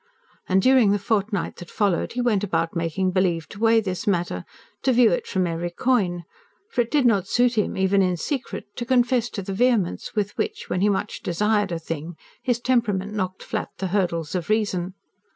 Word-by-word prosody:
And 190 0 +3
during 255 -5 +5
the 205 - +3
fortnight 205 -1 -1
that 175 - -10
followed 200 -5 0
he 245 - -1
went 215 -5 +1
about 165 -4 -1
making 170 +3 0
believe 180 -3 +1
to 200 - -10
weigh 225 0 +5
this 190 +1 -4
matter, 175 -3 0 0.4
to 265 - +2
view 240 -2 +5
it 170 - -1
from 185 -1 0
every 170 0 -2
coign; 180 -4 0 0.5
for - - +2
it 235 - -3
did 290 -2 +2
not 200 -6 +3
suit 245 +2 +2
him, 210 - 0
even 190 +1 +3
in 180 -2 +1
secret, 270 - -4
to 240 - -2
confess 245 -2 +2
to 200 - -5
the 195 - -4
vehemence 230 -4 +1
with 205 -1 -1
which, 435 0 -3
when 180 - 0
he 205 - +4
much 205 +1 -2
desired 205 +2 +1
a 170 - -1
thing, 165 0 -6 0.3
his 245 -3 0
temperament 215 -6 0
knocked 185 -3 -3
flat - - -3
the 190 -1 -3
hurdles 170 -5 -1
of 180 -2 -3
reason. 195 -4 0
200 Hz, 200 wpm, -24 LUFS, 180-230 Hz, 0.5 s, during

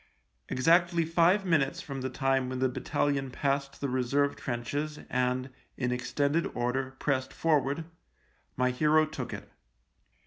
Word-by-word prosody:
Exactly 170 +5 +3
five 170 +5 +3
minutes 155 -7 +2
from 135 -2 -6
the 130 - -2
time 135 -1 0
when 130 - -3
the 130 +1 +2
battalion 135 +2 -1
passed 140 +1 -1
the 140 - -1
reserve 135 +2 +1
trenches 145 +5 -3
and, 125 +1 0 0.3
in 125 -2 -1
extended 140 +5 0
order, 130 +2 -1
pressed 130 -2 -1
forward, 155 -1 +1 0.7
my 125 0 +2
hero 155 +4 +4
took 155 - -6
it. - - -8
135 Hz, 135 wpm, -29 LUFS, 130-155 Hz, 0.7 s, hero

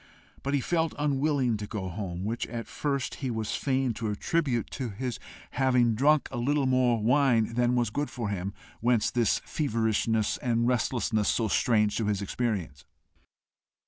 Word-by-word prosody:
But 140 +1 -1
he 140 - +1
felt 165 +2 0
unwilling 140 -4 +1
to 105 0 -6
go 100 -4 -4
home, 90 -1 -5
which 115 +3 -2
at 115 0 -5
first 140 -3 -2
he 130 - -1
was 110 -2 -2
fain 130 -3 0
to 110 0 -3
attribute 135 - -1
to 130 -3 -4
his 120 +4 -4 0.3
having 125 -3 +3
drunk 145 +6 +3
a 120 - -3
little 140 +3 +1
more 130 -2 +3
wine 120 -1 +3
than 120 +1 +2
was 120 -3 +1
good 145 +5 -2
for 115 -4 -4
him, 100 -1 -3 0.3
whence 115 -2 +2
this 120 -3 +2
feverishness 110 -5 0
and 120 -1 0
restlessness 115 -3 +1
so 115 - +1
strange 105 -1 +2
to 115 - 0
his 105 -2 0
experience. 95 - -3
120 Hz, 165 wpm, -28 LUFS, 110-135 Hz, 0.3 s, having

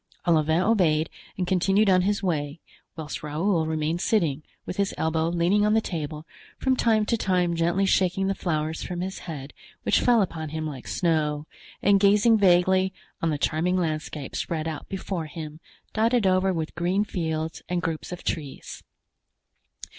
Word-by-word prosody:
Olivain 160 0 +3
obeyed 165 -8 +2 0.3
and 185 - 0
continued 195 +3 +2
on 185 -1 +5
his 200 +2 0
way, 150 -4 -1 0.4
whilst 155 -2 -6
Raoul 160 +3 0
remained 160 +2 -1
sitting, 160 -11 +1 0.2
with - - -5
his 200 -1 0
elbow 160 0 0
leaning 175 +4 +2
on 210 +1 +3
the - - +5
table, 155 -6 -5 0.3
from 260 -1 +1
time 220 -3 +2
to 230 - +1
time 180 -5 +1
gently 170 +4 +1
shaking 190 0 +2
the 195 - +1
flowers 160 -4 -2
from 175 -1 -4
his 190 +1 -4
head, 140 -3 -7 0.3
which - - +3
fell 235 -4 +4
upon 160 -4 -5
him 155 +1 -4
like 140 -5 -6
snow, 155 -3 0 0.4
and 200 0 +5
gazing 210 +3 +5
vaguely 185 0 +4 0.3
on 165 - +1
the 150 - 0
charming 165 +5 +1
landscape 155 -4 -3
spread 160 -1 -2
out 155 -2 -6
before 190 -4 -4
him, 155 0 -8 0.3
dotted 225 0 +2
over 190 0 +3
with 160 -3 -3
green 180 +4 +1
fields 160 -5 -3
and 175 -1 -1
groups 165 0 -3
of 180 - -7
trees. 145 -5 -5
175 Hz, 165 wpm, -25 LUFS, 155-195 Hz, 0.4 s, on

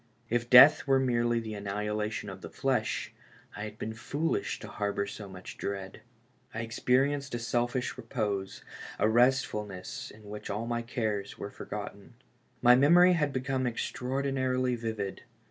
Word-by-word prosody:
If 120 0 0
death 135 +4 +9
were 135 -1 +4
merely 120 -2 +1
the 110 -1 -6
annihilation 105 +1 -3
of - - -10
the - - -8
flesh, - - -1 0.4
I 105 - -4
had 105 0 -8
been 110 - -4
foolish 145 +8 -2
to - - -7
harbor 100 -1 -2
so 100 -1 -8
much 95 -1 -10
dread. 95 -1 -5 0.5
I 115 - -2
experienced 135 +4 +1
a - - 0
selfish 120 +2 -1
repose, 100 -6 -3 0.3
a - - +3
restfulness 110 -5 +1
in 110 - -15
which 105 +1 -7
all 105 +3 -2
my 120 0 -1
cares 110 -5 -3
were - - -6
forgotten. - - -8 0.5
My 125 0 +8
memory 175 +7 +6
had 150 -4 +1
become 130 -1 -1
extraordinarily 130 +1 -1
vivid. 110 -4 -4
120 Hz, 145 wpm, -30 LUFS, 105-130 Hz, 0.5 s, death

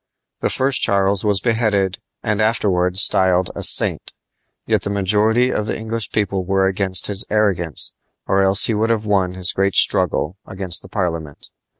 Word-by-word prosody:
The - - -1
first 130 0 +1
Charles 100 0 +1
was 105 -2 +3
beheaded 105 -5 0 0.2
and 105 0 -1
afterward 95 -5 0
styled 95 -2 +2
a - - -5
"saint"; - - +1 0.5
yet - - 0
the - - -4
majority 105 +5 +1
of 105 - -2
the - - -3
English 110 0 -5
people 100 -3 -1
were 95 +1 +1
against 95 0 0
his 100 +1 0
arrogance, 95 - 0 0.3
or 95 - +1
else 95 +1 +4
he 115 - +1
would 110 +2 0
have 110 -2 0
won 95 -3 0
his 95 0 -2
great 100 0 0
struggle 85 +6 +1
against 95 -3 -1
Parliament. 85 -7 -4
100 Hz, 165 wpm, -19 LUFS, 95-110 Hz, 0.5 s, else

